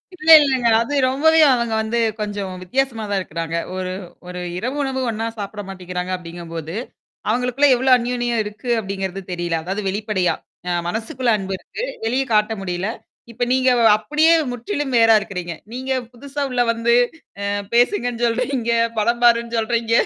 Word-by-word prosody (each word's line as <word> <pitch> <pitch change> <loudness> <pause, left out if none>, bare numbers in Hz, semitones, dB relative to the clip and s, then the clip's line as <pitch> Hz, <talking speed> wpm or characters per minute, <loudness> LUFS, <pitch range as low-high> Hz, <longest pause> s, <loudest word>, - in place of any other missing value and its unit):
இல்ல, 325 -2 -3
இல்லங்க. 260 -4 +1
அது 285 +5 -3 0.2
ரொம்பவே 320 +4 +3
அவுங்க 235 -2 0
வந்து 220 +2 -2 0.2
கொஞ்சம் 205 -3 -3
வித்தியாசமா 235 +3 -1
தான் 200 - +1
இருக்கிறாங்க. 165 -1 -4 0.2
ஒரு 185 -1 -3 0.4
ஒரு 180 0 -6 0.2
இரவு 250 +8 -3
உணவு 265 -1 -2
ஒண்ணா 225 0 -3
சாப்பிட 205 0 -5
மாட்டேங்கிறாங்க 180 -1 -5
அப்பிடிங்கம்போது, 170 -1 -7 0.5
அவுங்களுக்குள்ள 250 +5 +2
எவ்ளோ 260 +2 0
அன்னியோன்யம் 240 -1 -1
இருக்கு 215 +4 -8
அப்பிடிங்கிறது 195 -1 -4
தெரியல. 175 -2 -1
அதாவது 195 +5 -3
வெளிப்படையா! 205 -2 0 0.3
அ - - 0 0.2
மனசுக்குள்ள 235 - -1
அன்பு 195 -1 -4
இருக்கு. 465 - -7 0.2
வெளிய 255 +4 +1
காட்ட 210 +1 +3
முடியல. 180 +1 -3 0.4
இப்ப 245 +2 -3
நீங்க 260 0 +2 0.3
அப்பிடியே 300 +10 +2 0.2
முற்றிலும் 265 - -3
வேறா 225 -1 +6
இருக்கிறீங்க. 180 -4 -5 0.2
நீங்க 260 +1 -4 0.2
புதுசா 280 +4 -6
உள்ள 245 - +1
வந்து 230 +1 +1 0.5
அ - - 0 0.3
பேசுங்கன்னு 240 - +2
சொல்றீங்க, 235 0 -1 0.3
படம் 235 +3 +1
பாருன்னு 235 0 +3
சொல்றீங்க. 230 0 -1
230 Hz, 145 wpm, -20 LUFS, 195-250 Hz, 0.5 s, வேறா